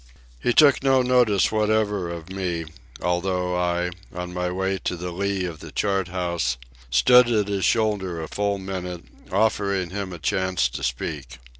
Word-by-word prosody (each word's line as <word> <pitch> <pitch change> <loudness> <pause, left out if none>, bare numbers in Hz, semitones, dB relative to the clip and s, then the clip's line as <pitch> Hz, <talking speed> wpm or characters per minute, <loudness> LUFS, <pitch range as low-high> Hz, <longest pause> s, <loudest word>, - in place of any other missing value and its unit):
He 120 - +1
took 140 +2 +6
no 135 -1 +4
notice 125 -6 +3
whatever 105 -4 +1
of 85 -1 -7
me, 90 -4 -2 0.4
although 90 0 0
I, 90 0 0 0.2
on 90 0 -6
my 90 0 -1
way 95 +1 -1
to 90 - -2
the 90 +1 -5
lee 95 +1 -1
of 85 -3 -6
the - - -10
chart 95 -3 0
house, 85 -9 -1 0.3
stood 120 - +6
at 105 -4 +2
his 100 -3 0
shoulder 100 -7 +1
a 80 - -5
full 100 +2 -1
minute, 90 -2 -5 0.3
offering 100 -5 +1
him 100 -1 -4
a 90 - -6
chance 90 -2 0
to - - -6
speak. 65 +1 -4
95 Hz, 165 wpm, -24 LUFS, 85-100 Hz, 0.4 s, took